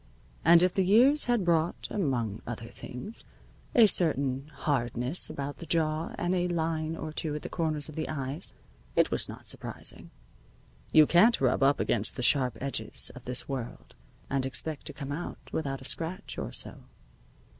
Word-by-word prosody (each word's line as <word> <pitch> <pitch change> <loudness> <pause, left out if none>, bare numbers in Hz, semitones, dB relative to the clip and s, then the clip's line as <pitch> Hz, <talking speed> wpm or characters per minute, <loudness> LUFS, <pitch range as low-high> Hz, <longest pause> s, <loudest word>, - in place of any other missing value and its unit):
And 170 +1 +7
if 180 - +2
the 190 - +2
years 250 +10 +6
had 240 -6 +1
brought, 165 -1 +1
among 120 - -1
other - - -6
things, - - -9 0.5
a 230 - +8
certain 140 -8 0
hardness 125 +1 +1
about 140 +1 -5
the 170 - -10
jaw 160 0 0
and 175 +1 -1
a 180 -1 +1
line 160 -2 -2
or 155 -1 -6
two 155 -1 -2
at 150 - -6
the - - -5
corners 155 -3 -1
of 155 - -10
the 155 - -3
eyes, 140 +3 -2 0.4
it - - +3
was - - +1
not - - -9
surprising. - - -2 0.8
You 155 -1 +7
can't 200 +10 +5
rub 130 0 +1
up 140 +1 +4
against 110 -2 0
the 125 - -3
sharp 130 -1 +4
edges 120 -5 -1
of 130 - -12
this 125 0 -1
world 130 -4 -6 0.3
and 135 -1 -1
expect 140 +3 -3
to - - -7
come 140 -2 -7
out 160 +5 -5 0.2
without 135 -4 -3
a - - -10
scratch 165 +6 -2
or - - -4
so. - - -1
155 Hz, 175 wpm, -29 LUFS, 135-170 Hz, 0.8 s, a